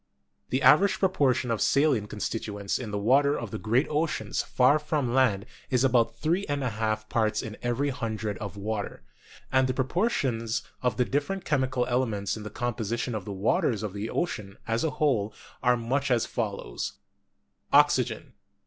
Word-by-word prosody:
The 130 Hz, +1 st, 0 dB
average 190 Hz, +5 st, +6 dB
proportion 135 Hz, -, +2 dB
of 115 Hz, -, -1 dB
saline 140 Hz, -7 st, +3 dB
constituents 105 Hz, -1 st, -3 dB
in 120 Hz, -4 st, -5 dB
the 105 Hz, -, -2 dB
water 140 Hz, +7 st, +3 dB
of 115 Hz, -4 st, -6 dB
the -, -, -4 dB
great 120 Hz, +7 st, +2 dB
oceans 155 Hz, +2 st, -1 dB
far 130 Hz, +4 st, +3 dB
from 150 Hz, -5 st, -1 dB
land 115 Hz, -7 st, +3 dB, 0.2 s
is 125 Hz, -1 st, +2 dB
about 120 Hz, -3 st, +2 dB
three 170 Hz, +5 st, 0 dB
and 145 Hz, -1 st, -1 dB
a 125 Hz, -, -1 dB
half 110 Hz, 0 st, -2 dB
parts 110 Hz, -1 st, 0 dB
in 110 Hz, -1 st, -6 dB
every 120 Hz, +4 st, 0 dB
hundred 110 Hz, -5 st, -3 dB
of 100 Hz, -1 st, -6 dB
water; 105 Hz, 0 st, -4 dB, 0.5 s
and 130 Hz, 0 st, +4 dB
the 130 Hz, -, -1 dB
pro 130 Hz, -, +1 dB
portions 130 Hz, -, 0 dB, 0.2 s
of 125 Hz, -4 st, 0 dB
the 125 Hz, -, +3 dB
different 145 Hz, +9 st, -2 dB
chemical 130 Hz, -4 st, +1 dB
elements 120 Hz, -5 st, -1 dB
in 110 Hz, -, -7 dB
the 105 Hz, -, -6 dB
com 120 Hz, +1 st, -2 dB
position 115 Hz, +2 st, -2 dB
of 105 Hz, -4 st, -4 dB
the 105 Hz, -, -5 dB
waters 105 Hz, +2 st, +1 dB
of 105 Hz, -3 st, -4 dB
the 105 Hz, +2 st, -4 dB
ocean 105 Hz, -, -3 dB
as 115 Hz, 0 st, 0 dB
a 160 Hz, -, +2 dB
whole 110 Hz, -9 st, +1 dB, 0.3 s
are 125 Hz, -1 st, +3 dB
much 130 Hz, +4 st, -1 dB
as 120 Hz, -2 st, +2 dB
follows: 100 Hz, -, -4 dB, 0.8 s
Oxygen, -, -, +4 dB
85. -, -, -26 dB
120 Hz, 180 wpm, -27 LUFS, 110-135 Hz, 0.8 s, average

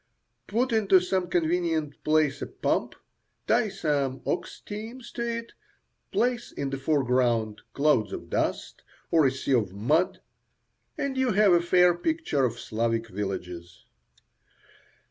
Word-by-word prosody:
Put 240 Hz, +5 st, 0 dB
into 205 Hz, -4 st, +5 dB
some 180 Hz, 0 st, -1 dB
convenient 165 Hz, -3 st, 0 dB
place 155 Hz, -2 st, +2 dB
a -, -, -3 dB
pump, -, -, -1 dB, 0.5 s
tie -, -, +2 dB
some 140 Hz, -3 st, -1 dB
ox -, -, -3 dB
teams 225 Hz, +4 st, -8 dB
to 235 Hz, -, -5 dB
it, 230 Hz, 0 st, -3 dB, 0.6 s
place 240 Hz, 0 st, 0 dB
in 140 Hz, -1 st, -4 dB
the 135 Hz, -, -3 dB
foreground 125 Hz, -6 st, +1 dB
clouds 140 Hz, -8 st, +2 dB
of -, -, -6 dB
dust -, -, -2 dB, 0.3 s
or 160 Hz, -4 st, +5 dB
a -, -, +1 dB
sea 135 Hz, +1 st, -2 dB
of 105 Hz, -7 st, +1 dB
mud, 150 Hz, -, +1 dB, 0.8 s
and 280 Hz, -3 st, -2 dB
you 255 Hz, -4 st, +2 dB
have 205 Hz, -1 st, +5 dB
a 170 Hz, -, +5 dB
fair 180 Hz, 0 st, +5 dB
picture 175 Hz, -, -1 dB
of 120 Hz, -1 st, -3 dB
Slavic 115 Hz, +1 st, -1 dB
villages. 90 Hz, -4 st, -6 dB
155 Hz, 135 wpm, -27 LUFS, 125-200 Hz, 0.8 s, into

